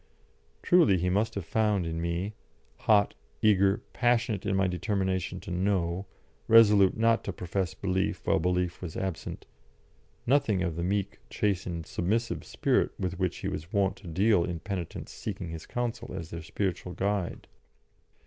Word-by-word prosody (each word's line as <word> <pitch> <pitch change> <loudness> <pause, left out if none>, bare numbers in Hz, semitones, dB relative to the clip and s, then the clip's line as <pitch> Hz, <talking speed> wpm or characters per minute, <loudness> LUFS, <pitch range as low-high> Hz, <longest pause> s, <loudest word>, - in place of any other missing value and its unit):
Truly, 170 - +5
he 90 +1 0
must 110 +4 +1
have 100 -4 -3
found 105 -2 +1
in 80 0 -3
me 85 +5 -2 0.4
hot, 105 -2 +3 0.3
eager, 100 -1 +4
passionate 115 -5 +1
in 95 - +1
my 95 0 +3
determination 95 0 -1
to - - -8
know, 90 0 0 0.4
resolute 105 -4 +6
not 115 +1 +3
to - - -3
profess 90 +1 -3
belief 95 0 -1
while - - +3
belief 90 +1 0
was 85 -4 -6
absent 95 -3 -4 0.8
nothing 115 -8 +2
of 85 -3 -2
the 85 - -3
meek, 100 +2 -1
chastened, 90 -5 -1
submissive 110 +9 -1
spirit - - +1
with 90 -1 -3
which 95 -2 0
he - - -4
was 80 +4 -5
wont 100 -2 +2
to 95 - -12
deal 95 +3 +3
in 85 0 -3
penitents 95 -5 -5
seeking 90 - -5
his 80 0 -7
counsel 120 -3 -3
as 85 -4 -6
their 85 - -5
spiritual 90 +2 -3
guide. 100 -2 -2
95 Hz, 155 wpm, -29 LUFS, 90-105 Hz, 0.8 s, resolute